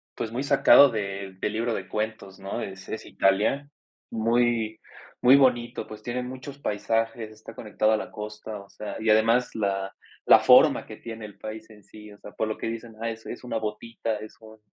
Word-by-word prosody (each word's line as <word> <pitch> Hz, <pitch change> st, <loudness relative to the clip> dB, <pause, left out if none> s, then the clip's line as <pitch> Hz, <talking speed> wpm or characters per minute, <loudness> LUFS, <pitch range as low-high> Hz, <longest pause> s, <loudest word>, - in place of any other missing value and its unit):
Pues 110 Hz, -, -4 dB
muy 125 Hz, +3 st, -2 dB
sacado 140 Hz, 0 st, +7 dB
del 100 Hz, -3 st, -5 dB
del 105 Hz, -, -2 dB
libro 115 Hz, +1 st, -1 dB
de 95 Hz, -3 st, -4 dB
cuentos, 105 Hz, -3 st, -4 dB
¿no? 95 Hz, 0 st, -4 dB
Es 95 Hz, -1 st, -8 dB
es 110 Hz, -, -5 dB
Italia, 105 Hz, +9 st, +1 dB, 0.4 s
muy 115 Hz, -1 st, +1 dB, 0.4 s
muy 130 Hz, +2 st, +8 dB
bonito, 125 Hz, -3 st, +2 dB
pues, 110 Hz, 0 st, -10 dB
tiene 125 Hz, +2 st, -3 dB
muchos 130 Hz, +2 st, -8 dB
paisajes, 115 Hz, -1 st, -1 dB
está 110 Hz, +1 st, -12 dB
conectado 110 Hz, 0 st, 0 dB
a 110 Hz, -, +3 dB
la -, -, -6 dB
costa, 105 Hz, 0 st, -7 dB
o 100 Hz, -, -13 dB
sea, 105 Hz, -, -7 dB
y 110 Hz, 0 st, -1 dB
además 115 Hz, +3 st, +3 dB
la 95 Hz, -2 st, -2 dB, 0.3 s
la -, -, +8 dB
forma -, -, +6 dB
que -, -, -10 dB
tiene 115 Hz, -2 st, -8 dB
el 105 Hz, -, -12 dB
país 110 Hz, +1 st, -8 dB
en 105 Hz, -2 st, -16 dB
sí, 105 Hz, +1 st, -13 dB
o 100 Hz, -, -14 dB
sea, 105 Hz, -, -11 dB
por 110 Hz, -, -2 dB
lo 110 Hz, -, -3 dB
que -, -, -4 dB
dicen: 115 Hz, 0 st, -6 dB
"Ah, 115 Hz, -, -1 dB
es 110 Hz, 0 st, -8 dB
es 120 Hz, -, -7 dB
una 120 Hz, -2 st, -3 dB
botita, 110 Hz, +1 st, -3 dB
es 110 Hz, +1 st, -10 dB
un 110 Hz, 0 st, -14 dB
110 Hz, 205 wpm, -26 LUFS, 105-115 Hz, 0.4 s, muy